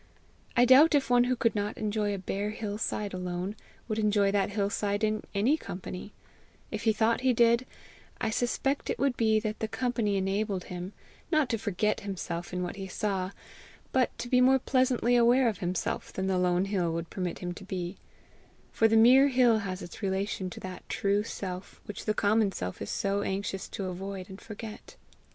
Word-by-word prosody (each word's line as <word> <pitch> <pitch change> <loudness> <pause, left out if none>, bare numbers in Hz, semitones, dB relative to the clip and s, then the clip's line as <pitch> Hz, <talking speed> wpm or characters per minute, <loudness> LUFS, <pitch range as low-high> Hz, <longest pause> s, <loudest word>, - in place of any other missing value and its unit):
I 245 - +7
doubt 280 +5 +7
if 275 -3 +1
one 245 0 +5
who 255 +1 +1
could 230 -1 +1
not 205 0 -2
enjoy 210 -1 -1
a 200 - -2
bare 195 +2 -3
hill 210 -1 -4
side 210 -2 -2
alone, 180 +2 -3 0.3
would 220 -1 -1
enjoy 205 -2 +3
that 200 -1 +1
hill 200 -1 -1
side 205 -1 -1
in 215 0 +1
any 240 +10 +3
company; 185 - -7 0.6
if - - -4
he 220 - +5
thought 225 +3 +1
he 260 -1 +3
did, 235 +2 +3 0.5
I 220 - 0
suspect 270 +4 -1
it - - -1
would 275 -2 +1
be 220 -2 +3
that 215 0 -3
the 220 - -1
company 230 -4 0
enabled 195 0 -1
him, 180 +2 -7 0.4
not 310 -5 +3
to 230 - 0
forget 210 0 0
himself 175 -3 -5
in 180 0 -2
what 180 +2 -5
he 195 -1 -5
saw, 190 -1 -2 0.6
but 260 -2 +1
to - - -5
be 250 0 +4
more 260 +1 +6
pleasantly 255 -2 +2
aware 240 +2 +5
of 215 -5 -1
himself 180 0 -2
than 190 - -3
the 190 -1 +1
lone 180 +1 +2
hill 185 -4 0
would 165 0 -4
permit 180 -3 -3
him 175 -1 -4
to 195 - -10
be; 185 -1 -4 0.7
for 225 - +4
the 225 0 +3
mere 255 +5 +7
hill 250 -4 +4
has 190 -2 -4
its 175 - -10
relation 195 -1 -1
to - - -9
that 185 -1 -7
true 200 +1 +1
self 190 -3 -6
which 205 - -7
the 215 - +1
common 210 0 +3
self 90 - -5
is 100 - -4
so 200 0 0
anxious 195 -1 -3
to 195 - -4
avoid 185 +1 -5
and 190 - -10
forget. 215 0 -9
205 Hz, 195 wpm, -29 LUFS, 190-230 Hz, 0.7 s, I